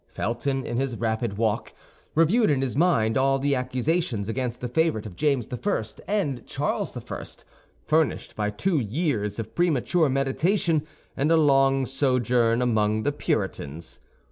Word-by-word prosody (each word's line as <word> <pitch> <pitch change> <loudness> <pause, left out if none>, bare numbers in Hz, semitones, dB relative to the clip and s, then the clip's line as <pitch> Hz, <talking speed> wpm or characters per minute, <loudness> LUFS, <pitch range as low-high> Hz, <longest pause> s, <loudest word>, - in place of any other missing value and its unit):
Felton, 135 +4 -2
in 120 - -3
his 130 -3 -1
rapid 110 -2 -1
walk, 110 -2 -1 0.4
reviewed 190 +9 +4
in 135 -2 +2
his 130 - -2
mind 130 -9 +3
all 135 +1 +3
the 140 +1 0
accusations 130 - -1
against 120 +1 -2
the 125 - -3
favorite 125 -4 +1
of 100 -5 -8
James 135 - +1
I. 125 - -1 0.2
and 160 - -1
Charles - - -2
I., - - -6 0.6
furnished 155 -1 0
by 105 -1 -1
two 155 - 0
years 110 - -1
of 115 - -6
premature 170 -1 +2
meditation 155 +4 +1 0.3
and 145 +4 +1
a 165 - +6
long 135 -3 +4
sojourn 125 -3 +1
among 110 -2 +1
the 145 - +1
Puritans. 80 - -3
130 Hz, 145 wpm, -25 LUFS, 115-155 Hz, 0.6 s, a